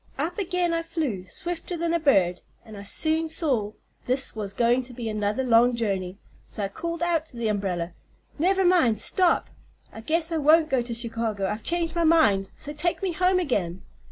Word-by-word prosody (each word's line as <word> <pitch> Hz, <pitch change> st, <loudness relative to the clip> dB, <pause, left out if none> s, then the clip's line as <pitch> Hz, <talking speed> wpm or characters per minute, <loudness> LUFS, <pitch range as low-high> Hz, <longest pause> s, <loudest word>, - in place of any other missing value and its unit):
Up 320 Hz, +9 st, -2 dB
again 360 Hz, -2 st, 0 dB
I 330 Hz, -, 0 dB
flew, 310 Hz, -, -3 dB
swifter 350 Hz, -, -5 dB
than 335 Hz, 0 st, -1 dB
a 340 Hz, -, +2 dB
bird, 190 Hz, -, +2 dB, 0.2 s
and 220 Hz, -, -11 dB
I 200 Hz, -, -8 dB
soon 315 Hz, +10 st, 0 dB
saw 260 Hz, -10 st, -1 dB, 0.3 s
this 260 Hz, 0 st, 0 dB
was 205 Hz, -3 st, -4 dB
going 240 Hz, +4 st, +2 dB
to 250 Hz, -, -10 dB
be 235 Hz, -1 st, -5 dB
another 215 Hz, +3 st, -1 dB
long 240 Hz, 0 st, +4 dB
journey; 195 Hz, -5 st, -2 dB, 0.3 s
so 210 Hz, -, -6 dB
I 195 Hz, -, -2 dB
called 335 Hz, +10 st, -4 dB
out 330 Hz, -2 st, 0 dB
to 245 Hz, -, -8 dB
the 230 Hz, -2 st, -1 dB
umbrella: 180 Hz, -4 st, -2 dB, 0.5 s
'Never 380 Hz, +3 st, +2 dB
mind; 330 Hz, -12 st, +4 dB
stop! 350 Hz, -, +3 dB, 0.4 s
I 220 Hz, -, -9 dB
guess 330 Hz, +6 st, 0 dB
I 325 Hz, -, 0 dB
won't 310 Hz, +1 st, +4 dB
go 260 Hz, -2 st, +2 dB
to 235 Hz, -1 st, -4 dB
Chicago. 230 Hz, -4 st, -2 dB
I've 210 Hz, +3 st, -3 dB
changed 335 Hz, +4 st, 0 dB
my 340 Hz, -, +1 dB
mind, 215 Hz, -13 st, +3 dB
so 295 Hz, -, -7 dB
take 345 Hz, +6 st, -1 dB
me 380 Hz, -, 0 dB
home 365 Hz, +2 st, +2 dB
again.' 190 Hz, -, -1 dB
260 Hz, 195 wpm, -25 LUFS, 210-330 Hz, 0.5 s, long